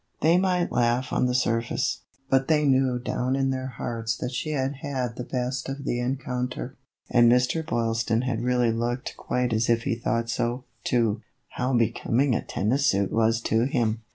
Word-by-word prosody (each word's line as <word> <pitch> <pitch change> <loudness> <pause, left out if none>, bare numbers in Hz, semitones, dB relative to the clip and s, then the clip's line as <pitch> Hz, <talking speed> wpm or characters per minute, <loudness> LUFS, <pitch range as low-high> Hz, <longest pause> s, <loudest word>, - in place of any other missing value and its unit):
They 165 +3 +5
might 180 -2 +1
laugh 120 +1 +1
on 125 - +2
the 125 - 0
surface, 115 -2 0 0.3
but 135 0 +2
they 150 -2 +3
knew 130 -2 +3
down 125 +1 -1
in 135 0 +1
their 130 0 -3
hearts 115 -3 -3
that 125 - -4
she 140 +5 -3
had 135 -2 -1
had 130 -4 -3
the 125 - -5
best 125 +2 -3
of 140 0 -5
the 120 - -1
encounter; 125 0 -3 0.4
and 120 -1 +6
Mr. 125 +6 +2
Boyl 115 -6 0
ston 115 +1 0
had 120 -3 -1
really 125 -1 +2
looked 120 +2 -2
quite 125 -2 -1
as 110 +2 +1
if 115 0 +2
he 135 - 0
thought 115 0 -1
so, 120 +2 -1 0.2
too. 115 -3 +1 0.3
How 125 +1 -2
becoming 120 +3 +1
a - - 0
tennis 130 +8 0
suit 100 -4 +2
was 115 +1 +2
to 115 +1 +1
him 115 -4 0
125 Hz, 185 wpm, -26 LUFS, 115-130 Hz, 0.4 s, and